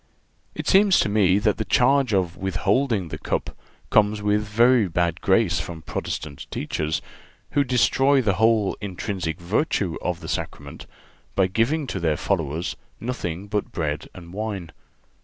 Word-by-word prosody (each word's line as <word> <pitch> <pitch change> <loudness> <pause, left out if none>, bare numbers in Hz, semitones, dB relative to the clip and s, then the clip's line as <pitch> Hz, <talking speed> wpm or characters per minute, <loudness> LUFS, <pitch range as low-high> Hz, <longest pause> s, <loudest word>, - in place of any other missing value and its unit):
It - - -5
seems 195 -1 +5
to - - 0
me 100 -3 +4
that 105 0 +1
the 110 - -1
charge 130 +5 +3
of 90 -4 +1
withholding 95 +2 0
the - - -6
cup - - -3 0.4
comes 105 0 +4
with 105 0 +1
very 115 +1 +4
bad 85 0 -1
grace 95 -3 +3
from 80 0 -6
Protestant 70 -1 -5
teachers, 75 0 -2 0.5
who 145 - +3
destroy 135 +2 +3
the 110 -6 +2
whole 110 -3 +3
intrinsic 95 -3 -4
virtue 90 - 0
of 90 -2 -2
the - - -8
Sacrament - - -5 0.5
by 95 - +4
giving 115 - 0
to 100 - -4
their 80 -3 +1
followers 85 -3 -1 0.2
nothing 100 -7 -4
but 105 0 -2
bread 75 -3 -3
and 85 -1 -11
wine. 100 -5 -4
100 Hz, 150 wpm, -24 LUFS, 85-115 Hz, 0.5 s, seems